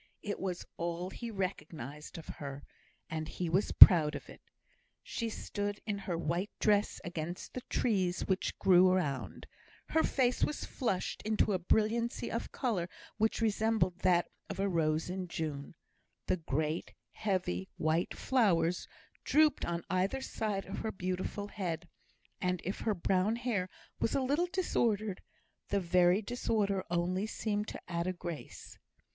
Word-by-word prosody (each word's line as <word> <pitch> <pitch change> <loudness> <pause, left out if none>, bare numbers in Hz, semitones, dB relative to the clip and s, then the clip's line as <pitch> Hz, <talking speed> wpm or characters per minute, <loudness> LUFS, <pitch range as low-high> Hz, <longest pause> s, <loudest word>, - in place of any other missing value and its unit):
It 205 - -3
was 185 -2 -3
all 170 +2 -3
he 235 +3 -6
recognised 155 - -5
of 165 - -8
her, 140 -1 -7 0.4
and 155 -1 -4
he 175 +1 -3
was 190 +5 +2
proud 160 -5 +10
of - - -8
it. - - -12 0.6
She 230 -1 -3
stood 205 -1 -3
in 205 -2 -2
her 180 -3 -3
white 170 +5 -1
dress 210 -1 +2
against 175 -1 -5
the 255 - -4
trees 185 -6 +1
which 190 -1 -1
grew 185 -1 +6
around; 150 -8 -1 0.4
her 320 - +3
face 250 -5 +2
was 300 - -1
flushed 210 -9 -2
into 215 -1 +1
a 185 - +1
brilliancy 220 +6 +1
of - - -3
colour 200 - -1 0.3
which 220 +1 +1
resembled 220 -4 +1
that 175 -2 +3 0.2
of - - -5
a 200 - +2
rose 160 -3 +1
in 185 0 -4
June; 150 -4 -4 0.5
the - - +1
great 155 0 -2 0.2
heavy 180 - -1
white 160 +3 0
flowers 180 -9 +2 0.4
drooped 305 -1 +4
on 170 0 -2
either 190 +8 +1
side 215 -6 -2
of - - -5
her 220 - -2
beautiful 185 +2 -3
head, 175 -5 -3 0.5
and 180 -1 0
if 190 - -3
her 215 -2 0
brown 190 +4 +1
hair 230 -7 -1 0.3
was - - +1
a 275 - +2
little 290 +7 +1
disordered, 220 - 0 0.5
the 200 - +1
very 180 +2 +3
disorder 205 -4 0
only 180 +4 0
seemed 210 -1 -2
to - - -6
add 170 0 -2
a 185 - 0
grace. 175 -3 -8
185 Hz, 150 wpm, -33 LUFS, 170-215 Hz, 0.6 s, proud